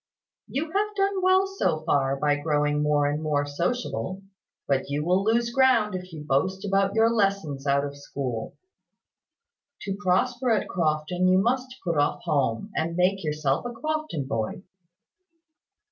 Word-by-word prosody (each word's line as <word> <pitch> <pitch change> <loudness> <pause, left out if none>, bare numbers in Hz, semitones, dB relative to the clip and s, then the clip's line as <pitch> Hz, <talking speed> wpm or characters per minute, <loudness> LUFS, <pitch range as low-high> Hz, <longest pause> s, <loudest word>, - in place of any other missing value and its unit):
You 280 +4 -2
have 420 +3 0
done 395 -1 +1
well, 375 +1 +4
so 385 - -1
far, 135 -1 +1
by 145 +1 +1
growing 150 0 0
more 150 -1 +2
and 145 +2 -1
more 150 -2 0
sociable; 185 +4 -3 0.4
but 135 0 0
you 145 +2 -2
will 185 +3 +2
lose 230 +2 +1
ground 250 -6 +4
if 185 0 -6
you 155 -2 -8
boast 190 +8 0
about 195 0 +1
your 225 0 +5
lessons 195 -11 0
out 140 0 +2
of 140 0 -6
school. 135 -5 -5 1.2
To 195 -1 -3
prosper 240 +7 +1
at 220 -3 +2
Crofton, 165 +1 0
you 185 0 +5
must 255 +5 0
put 170 -5 0
off 145 - 0
home, 140 - 0
and 165 +1 -1
make 185 +2 +2
yourself 150 -3 0
a 245 0 -5
Crofton 310 - -3
boy." 115 - -3
180 Hz, 155 wpm, -26 LUFS, 145-230 Hz, 1.2 s, your